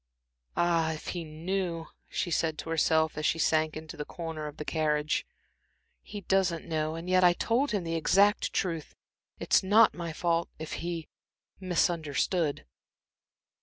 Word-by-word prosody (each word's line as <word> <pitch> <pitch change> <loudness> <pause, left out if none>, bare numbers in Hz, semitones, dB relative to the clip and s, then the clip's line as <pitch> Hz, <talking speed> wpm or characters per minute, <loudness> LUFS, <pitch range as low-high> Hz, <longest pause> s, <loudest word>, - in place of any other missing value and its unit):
"Ah, 165 -2 +2
if 155 - -7
he 175 -2 -3
knew!" 165 +2 -3 0.2
she 175 - -2
said 160 -1 0
to 165 - -6
herself, 160 -1 +2
as - - -4
she - - +1
sank 155 -1 +1
into 155 0 -8
her 150 - -3
corner 160 -1 -6
of 150 - -9
the 150 - -6
carriage. 150 -1 0 0.7
"He 205 - -8
doesn't 185 -3 +1
know. 155 -1 -1
And 165 +2 -7
yet 185 0 +4
I 175 -1 +7
told 245 +10 +1
him 205 -4 -1
the 165 0 -3
exact 200 +5 +3
truth. 165 -5 -2 0.4
It's - - +3
not 210 +4 +5
my 170 -2 -5
fault, 170 +1 0
if 155 0 -6
he 170 -2 -4 0.5
misunderstood." 170 -3 0
165 Hz, 155 wpm, -29 LUFS, 155-180 Hz, 0.7 s, I